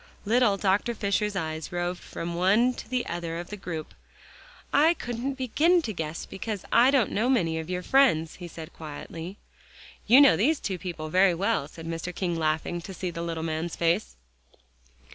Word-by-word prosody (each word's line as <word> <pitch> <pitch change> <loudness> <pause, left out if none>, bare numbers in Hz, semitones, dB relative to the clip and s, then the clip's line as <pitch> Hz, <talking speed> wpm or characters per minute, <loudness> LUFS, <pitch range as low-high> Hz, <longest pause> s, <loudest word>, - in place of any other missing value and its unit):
Little 225 -2 +3
Dr. 200 +4 +1
Fisher's 205 0 0
eyes 160 -3 -3
roved 175 0 -2
from 170 +1 -5
one 205 +8 +3
to - - -9
the 250 -1 -1
other 170 -1 -4
of 175 +2 -7
the - - -4
group. 170 -5 -6 0.8
"I 315 +4 +5
couldn't 245 +1 -4
begin 310 +7 +2
to 220 - -3
guess 160 -2 -4
because 205 0 -5
I 240 +3 +6
don't 270 -6 +3
know 230 +5 +1
many 165 -11 +2
of 160 +1 -7
your 180 0 -2
friends," 170 - +3
he 175 - -7
said 165 0 -10
quietly. 165 +4 -8 0.7
"You 250 +4 +8
know 280 -2 +7
these 290 +8 +2
two 190 -3 -3
people 165 -3 -5
very 185 +1 +4
well," 170 -5 0
said 165 +1 -11
Mr. 165 +1 -4
King, 175 -3 -1
laughing, 160 +2 -1
to 190 +2 -8
see 180 0 -3
the 170 - -5
little 165 -1 -3
man's 160 +1 -3
face. 165 - 0
180 Hz, 180 wpm, -27 LUFS, 165-230 Hz, 0.8 s, You